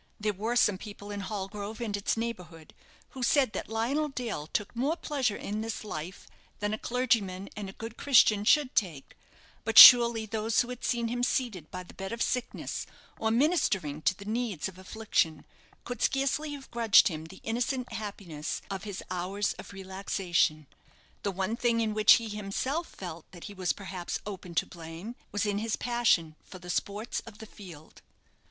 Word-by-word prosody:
There 210 0 0
were 220 +5 -2
some 210 -5 +3
people 205 -1 -9
in 205 - -4
Hallgrove 205 +1 -5
and 220 -4 -2
its 205 +2 -1
neighbourhood 180 -9 -6 0.4
who 260 - -9
said 260 -1 +3
that - - -5
Lionel 255 +8 0
Dale 235 - -4
took 205 +7 -3
more 275 +7 +1
pleasure 265 -11 -1
in 210 +1 -4
this 225 0 -4
life 180 -2 -6 0.3
than 205 +1 -2
a 215 - -3
clergyman 225 -7 0
and 205 -2 -5
a - - -10
good 225 +2 -8
Christian 225 -7 +5
should 275 +4 +4
take; 165 - -2 0.5
but 225 0 -1
surely 235 -2 +11
those 220 +1 +1
who 245 - -4
had 250 -1 -7
seen 235 -1 0
him 245 +1 -2
seated 230 - -1
by 180 0 -6
the 175 - -15
bed 195 0 -6
of 230 0 -1
sickness, 250 -1 -3 0.3
or 220 - +1
ministering 220 - +1
to 185 +4 +1
the 200 - -10
needs 220 -6 -2
of 185 -1 -11
affliction, 190 -6 -1 0.4
could 245 - -5
scarcely 275 +3 0
have 275 -2 -10
grudged 230 -3 +6
him 160 -4 -4
the 190 +4 -12
innocent 245 +2 -2
happiness 200 -8 -5
of 195 +1 -5
his 200 -3 -6
hours 190 +3 -1
of - - -9
relaxation. 190 -5 -1 0.6
The 205 - -1
one 195 +3 -2
thing 235 -1 +1
in 220 -2 0
which 215 0 +7
he 230 -2 +1
himself 215 - -3
felt 170 -3 -9
that 175 - -11
he 205 - -7
was 185 -2 0
perhaps 190 -3 -5
open 185 -4 -7
to - - +2
blame, 170 +6 -8 0.2
was 205 +1 0
in 205 -1 0
his 220 0 -1
passion 220 -10 +1
for 185 - -11
the 180 0 -6
sports 205 +6 -2
of 215 -2 -11
the 220 - -9
field. 175 -8 -13
210 Hz, 185 wpm, -29 LUFS, 190-235 Hz, 0.6 s, surely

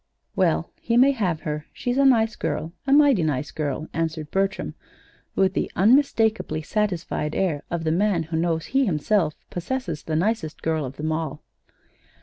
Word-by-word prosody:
"Well, 80 +1 +1
he 235 0 +1
may 265 +3 +6
have 185 - -1
her. 150 -2 -4
She's 245 +2 -2
a 275 - +5
nice 225 -4 +4
girl 165 +2 -3
a - - +1
mighty 285 - +6
nice 150 -3 -1
girl," 155 0 -3
answered 160 -2 -3
Bertram, 195 +1 -1 0.6
with 190 -1 +3
the - - -1
unmistakably 220 - +3
satisfied 175 -6 -1
air 165 -7 0
of 170 -1 -2
the 160 - +1
man 180 0 +2
who 160 +1 -5
knows 165 -1 0
he 270 +1 +2
himself 160 0 +1 0.2
possesses 175 - -3
the 155 - -3
nicest 180 -2 -1
girl 160 -2 0
of 130 +1 -7
them 155 +1 -2
all. 155 -2 -3
170 Hz, 165 wpm, -24 LUFS, 155-220 Hz, 0.6 s, may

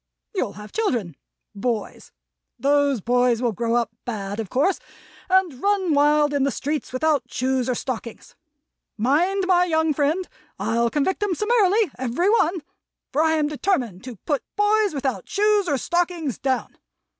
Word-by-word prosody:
You'll 255 - -2
have 210 +2 -11
children 240 - -1 0.4
boys. 220 0 -4 0.5
Those 280 -2 +2
boys 245 +1 +2
will 240 -1 +1
grow 230 +2 -1
up 240 -2 +1
bad, 205 -3 -4
of 215 -4 -4
course, 305 +9 +1 0.5
and 365 -8 +2
run 395 -5 +1
wild 295 0 +3
in 285 - +1
the 275 - +2
streets 295 +2 -3
without 290 +2 0
shoes 260 0 0
or 250 - +1
stockings. 235 -2 -6 0.6
Mind, 335 - +2
my 360 -1 +4
young 320 -2 +1
friend! 305 +6 0 0.3
I'll 235 +1 +1
convict 300 - 0
'em 405 -4 0
summarily 425 - +2
every 260 - +1
one, 355 -7 +2 0.5
for 295 - +2
I 320 0 +3
am 305 -2 +1
determined 275 - -1
to 250 -3 -7
Put 290 -4 0
boys 415 -3 +2
without 270 -1 -3
shoes 415 -1 +2
or 285 -4 +1
stockings, 345 -3 -1
Down. 265 -1 -2
290 Hz, 155 wpm, -23 LUFS, 245-360 Hz, 0.6 s, my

